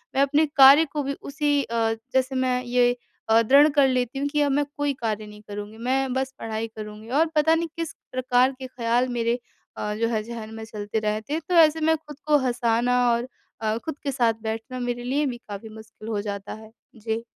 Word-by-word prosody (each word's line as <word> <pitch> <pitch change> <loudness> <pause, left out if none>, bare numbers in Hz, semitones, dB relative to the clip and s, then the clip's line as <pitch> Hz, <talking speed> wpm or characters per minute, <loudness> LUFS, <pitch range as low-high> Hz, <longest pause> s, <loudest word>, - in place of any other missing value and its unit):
मैं 270 - +3
अपने 290 +3 +3
कार्य 275 +4 +9
को 295 -1 -1
भी 280 +1 -2
उसी 290 0 0
अ, 225 -2 0 0.2
जैसे 260 0 +1
मैं 255 -1 +1
ये 245 0 +3 0.4
अ, 225 +1 +6
दृढ़ 275 +6 +6
कर 280 -2 +5
लेती 255 0 -1
हूँ 280 - 0
कि 295 +1 0
अब 285 -1 +2
मैं 290 +1 +2
कोई 290 -1 0
कार्य 215 -2 -2
नहीं 210 0 -12
करूँगी, 205 +1 -7
मैं 260 +2 0
बस 265 0 -2
पढ़ाई 225 0 -3
करूँगी 215 +1 -8
और 290 +6 +3
पता 315 +2 +4
नहीं 335 +1 -1
किस 330 -1 -3 0.2
प्रकार 255 0 +2
के 260 - -6
ख़्याल 245 0 0
मेरे 235 +1 0 0.4
अ, 210 - -2
जो 230 +2 0
है 220 -2 -1
ज़हन 220 -1 -8
में 225 - -7
चलते 210 0 -4
रहते 215 +5 -2
हैं। 320 - -1
तो - - 0
ऐसे 320 -1 +6
मैं 320 +1 +3
ख़ुद 300 -2 -13
को 300 -1 +5
हँसाना 240 0 +1
और 235 +1 0 0.3
अ, 220 0 0
ख़ुद 305 +5 -6
के 280 - -1
साथ 240 -4 +2
बैठना 225 +3 -4
मेरे 245 0 -3
लिए 275 +4 0
भी 250 -3 -3
काफ़ी 205 +1 -7
मुश्किल 220 0 -12
हो 210 -2 -1
जाता 200 -1 -5
है। 220 0 -12 0.2
जी। 225 0 -3
245 Hz, 220 wpm, -24 LUFS, 220-280 Hz, 0.4 s, कार्य